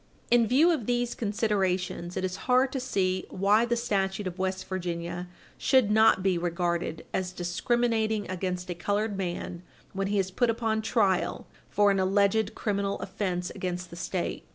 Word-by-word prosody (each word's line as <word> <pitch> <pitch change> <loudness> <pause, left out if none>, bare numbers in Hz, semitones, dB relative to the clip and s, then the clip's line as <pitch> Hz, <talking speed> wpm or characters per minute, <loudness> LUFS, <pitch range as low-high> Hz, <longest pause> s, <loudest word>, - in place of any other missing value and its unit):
In 235 -2 +5
view 295 +9 +5
of 280 -10 -1
these 245 -1 0
considerations, 190 -5 -1
it 185 - 0
is 185 0 -3
hard 255 +1 +4
to 265 - -2
see 185 -7 -1
why 205 +4 +3
the 240 0 0
statute 195 -3 -1
of 185 0 -5
West 190 0 -2
Virginia 175 -1 -4 0.3
should 255 -6 +3
not 220 -3 +5
be 185 -3 +2
regarded 170 -1 -2
as 185 -1 -1
discriminating 220 +4 0
against 180 -1 -3
a - - 0
colored 205 +4 -1
man 175 -2 -4 0.3
when 195 0 -1
he 205 +1 0
is 190 -1 0
put 240 +5 +1
upon 225 -1 0
trial 205 -5 +1 0.2
for 205 0 +4
an 195 - +1
alleged 200 +3 +2
criminal 200 -1 -1
offence 185 -3 -3
against 180 -1 -4
the - - -8
State. 175 +1 -3
195 Hz, 165 wpm, -28 LUFS, 180-220 Hz, 0.3 s, In